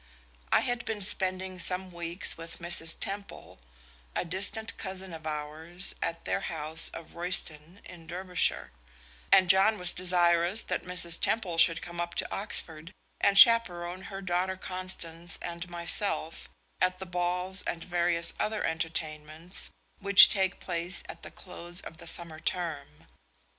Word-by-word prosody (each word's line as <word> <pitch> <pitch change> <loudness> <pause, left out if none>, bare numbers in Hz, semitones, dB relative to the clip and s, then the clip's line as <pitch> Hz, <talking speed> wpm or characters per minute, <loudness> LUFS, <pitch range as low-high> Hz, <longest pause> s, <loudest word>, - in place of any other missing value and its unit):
I - - +4
had 245 -1 -2
been 215 -4 -1
spending 185 -1 -1
some 185 0 0
weeks 170 +1 0
with 165 0 -10
Mrs. 170 -1 +1
Temple, 200 - -7 0.6
a - - -2
distant 200 +5 -4
cousin 190 -2 -6
of 160 -1 -9
ours, 155 +4 -1
at 165 - -4
their - - -1
house 160 0 +2
of 165 - -11
Royston 170 0 -2
in 170 -3 -13
Derbyshire, 180 +1 -2 0.6
and 190 -1 +6
John 195 +4 +4
was 180 -2 +5
desirous 175 +2 +1
that - - -4
Mrs. 170 -2 +1
Temple 180 -7 0
should 165 0 +4
come 175 0 -6
up 175 0 -5
to - - -4
Oxford 165 -5 0 0.3
and 200 0 +2
chaperone 185 -7 +5
her 195 -1 -8
daughter 185 +1 -2
Constance 175 -3 -2
and 170 +1 -7
myself 170 0 -3 0.3
at 185 0 +1
the 190 - -7
balls 180 +2 0
and 165 - -5
various 170 -1 +4
other 215 0 -2
entertainments 160 +1 -3 0.3
which 200 -1 +9
take 190 -2 -1
place 175 0 -3
at - - -9
the - - -9
close 175 -1 -6
of 160 - -9
the 170 - -11
summer 165 -1 -2
term. 160 - -4
175 Hz, 145 wpm, -28 LUFS, 165-190 Hz, 0.6 s, which